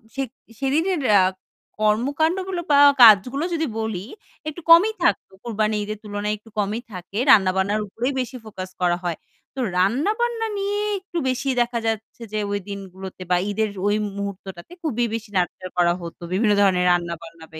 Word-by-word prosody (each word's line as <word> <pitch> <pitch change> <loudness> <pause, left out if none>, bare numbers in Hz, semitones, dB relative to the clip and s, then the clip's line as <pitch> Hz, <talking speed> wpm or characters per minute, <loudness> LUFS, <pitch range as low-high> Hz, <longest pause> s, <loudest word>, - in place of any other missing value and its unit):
সে 270 - -1 0.4
সেদিনের 310 +5 +1 0.2
আ - - +6 0.6
কর্মকান্ডগুলো 315 - +1
বা 285 - +6 0.2
কাজগুলো 240 +6 +7
যদি 320 -1 0
বলি 215 -4 -3 0.4
একটু 325 +3 -9
কমই 370 +7 +8
থাকত। - - +2 0.2
কুরবানী 215 -2 0
ঈদের 215 +1 -5
তুলনায় 210 0 -2
একটু 225 +2 -19
কমই 210 +3 -1
থাকে। 185 +2 -8
রান্না-বান্নার 190 +1 +4
উপরেই 245 +7 -3
বেশি 255 0 -4
focus 190 -3 -7
করা 175 -1 +2
হয়। 170 -2 -2 0.4
তো 270 - -6 0.2
রান্না-বান্না 430 - +1
নিয়ে 405 +1 -1 0.2
একটু 375 -2 -8
বেশি 260 +2 -2
দেখা 240 0 0
যাচ্ছে 220 +1 -4
যে 215 - 0
ওই 205 - 0
দিনগুলোতে 190 -1 -8
বা - - +5
ঈদের 215 +1 0 0.2
ওই 205 - +2 0.2
মুহূর্তটাতে 195 - -7
খুবই 240 -7 0
বেশি 225 -1 -4
nurture 185 0 -2
করা 175 -1 +4
হতো। 170 0 -9
বিভিন্ন 210 +2 +3
ধরনের 185 -2 +3
রান্না-বান্না 170 -2 -3
বে 160 - -8
215 Hz, 155 wpm, -22 LUFS, 190-275 Hz, 0.6 s, কমই